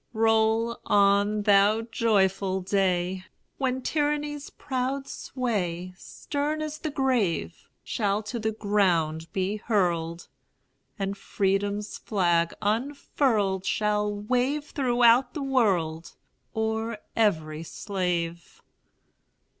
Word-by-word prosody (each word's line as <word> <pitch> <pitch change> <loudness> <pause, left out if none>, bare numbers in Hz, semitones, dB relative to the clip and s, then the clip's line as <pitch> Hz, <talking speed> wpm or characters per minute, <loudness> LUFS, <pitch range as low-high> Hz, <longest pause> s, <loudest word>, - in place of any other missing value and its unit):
Roll 225 +1 +2
on, 205 +1 +3
thou 205 +2 +4
joyful 195 -4 +1
day, 185 -1 0 0.4
When 260 -1 -1
tyranny's 295 -1 -1
proud 270 0 -3
sway, 185 -8 -3
Stern 295 +9 -3
as 305 0 -5
the 310 - -3
grave, 235 - -1
Shall 205 -1 -1
to 235 +3 -4
the 220 0 -1
ground 175 -7 +1
be 195 +2 -1
hurled, 175 -6 -1 0.7
And 195 0 -2
Freedom's 200 +1 -1
flag 175 -5 +1
unfurled 220 -4 0
Shall 210 +1 0
wave 255 +8 -1
throughout 245 -1 +3
the 295 - -3
world, 185 -12 0 0.4
O'er 220 0 -1 0.2
every 160 -8 +1
slave! 170 -2 -3
210 Hz, 95 wpm, -26 LUFS, 190-245 Hz, 0.7 s, thou